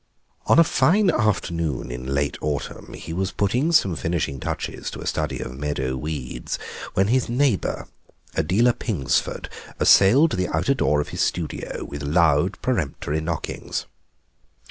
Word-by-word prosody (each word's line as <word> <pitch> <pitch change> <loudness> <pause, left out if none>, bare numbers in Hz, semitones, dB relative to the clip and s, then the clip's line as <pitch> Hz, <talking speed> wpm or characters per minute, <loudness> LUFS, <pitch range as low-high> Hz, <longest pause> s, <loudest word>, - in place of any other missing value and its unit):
On - - +5
a 165 - +9
fine 190 +4 +3
afternoon 85 - -1
in 65 +2 -4
late 70 0 0
autumn 75 -1 -4
he 80 - -7
was 95 +2 -1
putting 125 - +1
some 100 - +4
finishing 75 -2 -2
touches - - -4
to - - -8
a - - -7
study - - -1
of 65 - -6
meadow 70 -2 -2
weeds 65 -3 -4 0.4
when 95 +2 +3
his 130 0 +2
neighbour, 125 -4 0 0.5
Adela 100 +10 +3
Pingsford, 95 - -1 0.3
assailed 135 +12 +6
the 90 -1 0
outer 85 - +1
door 75 - +2
of - - -6
his - - -3
studio 85 -3 -2
with 70 0 -7
loud 75 +2 +2
peremptory 80 - -1
knockings. 80 0 -4
85 Hz, 145 wpm, -23 LUFS, 70-110 Hz, 0.5 s, a